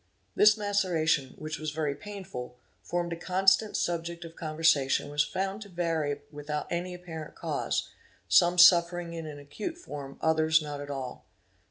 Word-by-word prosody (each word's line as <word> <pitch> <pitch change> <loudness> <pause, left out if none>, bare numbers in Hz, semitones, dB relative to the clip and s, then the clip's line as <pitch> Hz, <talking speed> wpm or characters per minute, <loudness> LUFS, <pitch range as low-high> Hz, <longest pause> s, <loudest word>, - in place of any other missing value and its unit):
This 210 +1 +6
maceration, 175 -9 +1
which 155 0 -5
was 155 0 -3
very 150 -1 -1
painful, 175 -10 -8 0.2
formed 175 -1 -2
a - - -3
constant 190 +4 +2
subject 170 0 -2
of 165 0 -11
conversation 155 -3 +2
and 145 - -9
was 150 0 +3
found 190 +6 -3
to 205 - -9
vary 165 -5 -1
without 150 0 -4
any 180 +1 -2
apparent 165 -3 -8
cause; - - -2 0.4
some 175 +1 +5
suffering 175 -1 +6
in 165 -1 -5
an 150 -1 -7
acute 145 - -6
form, 140 - -8
others 160 0 +3
not 145 -2 -5
at 145 - -8
all. 135 -3 -6
165 Hz, 160 wpm, -29 LUFS, 150-180 Hz, 0.4 s, This